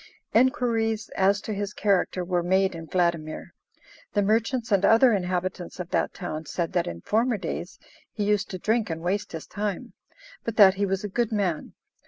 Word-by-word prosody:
Enquiries 230 -3 +2
as 195 +1 +2
to 215 - -4
his 205 0 -4
character 190 -3 +1
were 175 -1 0
made 190 +2 +2
in 165 -1 -8
Vladimir. 170 -2 -1 0.6
The 205 - +2
merchants 225 +3 0
and 200 -1 +3
other 230 +4 +6
inhabitants 180 -1 -2
of 180 -1 -6
that - - +1
town 155 -4 -6
said 170 -1 -3
that 175 -2 +1
in 85 0 -6
former 225 - +1
days 180 -1 -5 0.3
he 210 - -3
used 210 0 +1
to 185 - -4
drink 220 +3 0
and 165 0 -4
waste 195 +4 -2
his 160 - -6
time, 210 +4 -4 0.5
but 230 - -3
that 195 -3 +8
he 200 +1 -1
was 195 +1 -1
a - - -2
good 230 +3 -1
man. 190 -7 -1
200 Hz, 185 wpm, -26 LUFS, 180-220 Hz, 0.6 s, that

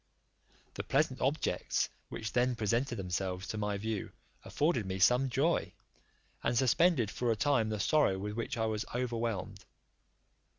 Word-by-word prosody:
The - - -4
pleasant - - +1
objects - - 0 0.2
which 110 - -5
then 125 0 +2
presented 115 +4 0
themselves 95 -1 -3
to 110 - -3
my 105 -1 -1
view 110 0 -3 0.3
afforded 145 - 0
me 95 0 -2
some 125 +7 +4
joy, 140 +7 +1 0.7
and 120 - 0
suspended 135 - +3
for 120 -1 0
a - - +2
time 115 -2 +2
the 110 -1 -2
sorrow 145 -4 +3
with 105 +2 -4
which 115 +1 -3
I 110 - +1
was 110 0 -1
overwhelmed. 115 -5 -2
115 Hz, 145 wpm, -32 LUFS, 100-125 Hz, 0.7 s, some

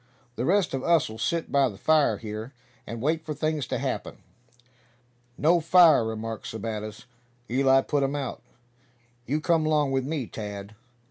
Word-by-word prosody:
The 120 - -2
rest 190 -2 +2
of 130 -1 -2
us'll 155 -10 +1
sit 165 +9 -1
by 140 -2 +3
the 100 - -10
fire 150 -7 +3
here, 110 +4 -7 0.3
and 115 0 -6
wait 160 +2 0
for 155 -1 -5
things 155 -1 -1
to - - -2
happen." - - -4 1.2
"No 170 +4 +4
fire," 165 -5 +6
remarked 110 0 -5
Sebattis. 110 0 -6 0.5
"Eli 135 +1 +4
put 145 +1 -1
um 135 +1 0
out. 140 -3 -4 0.9
You 145 +5 0
come 165 0 +2
'long 150 -3 +2
with 135 -1 0
me, 150 -4 -2
Tad!" 105 -2 -7
135 Hz, 155 wpm, -26 LUFS, 110-155 Hz, 1.2 s, fire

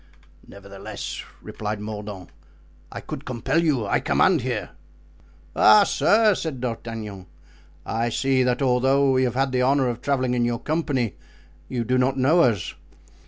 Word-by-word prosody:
"Nevertheless," 100 0 -8 0.2
replied 105 0 -5
Mordaunt, 105 -3 -7 0.6
"I - - -7
could - - -7
compel 125 +6 -1
you; 140 -9 +1
I 100 - +1
command - - +2
here." - - -3 0.8
"Ah, 105 0 +7
sir!" 210 +8 +3
said 160 -7 -4
D'Artagnan, 115 -5 -6 0.6
"I 115 +1 -1
see 135 +2 +1
that 125 +2 +1
although 135 +2 +3
we 130 0 +2
have 125 -1 -2
had 135 0 +1
the 125 0 +1
honor 135 +1 +2
of 120 0 -5
traveling 130 -3 0
in 120 -1 +1
your 120 0 0
company 140 - -1 0.5
you 120 -2 -2
do 125 +2 +1
not 130 +1 +1
know 150 +7 +4
us. 115 - +1
125 Hz, 150 wpm, -23 LUFS, 110-135 Hz, 0.8 s, Ah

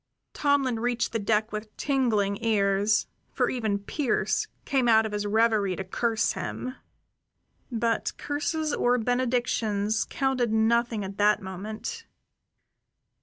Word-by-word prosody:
Tomlin 275 -5 +1
reached 240 +1 0
the 225 - -1
deck 215 +1 +1
with 215 0 -7
tingling 225 -7 +1
ears, 205 -1 +2 0.3
for - - +1
even 220 -5 0
Pearse 250 +7 -1 0.2
came 265 -3 +1
out 220 -1 +5
of 220 - -3
his 205 0 -2
reverie 215 -3 +2
to 190 - -4
curse 225 +4 0
him. 255 - -4 1.0
But 230 -1 0
curses 305 +1 -2
or 245 +1 +2
benedictions 235 -4 0
counted 260 -4 0
nothing 225 -1 +2
at 195 +1 -8
that 210 +1 +4
moment. 215 - -6
225 Hz, 120 wpm, -27 LUFS, 210-245 Hz, 1.0 s, out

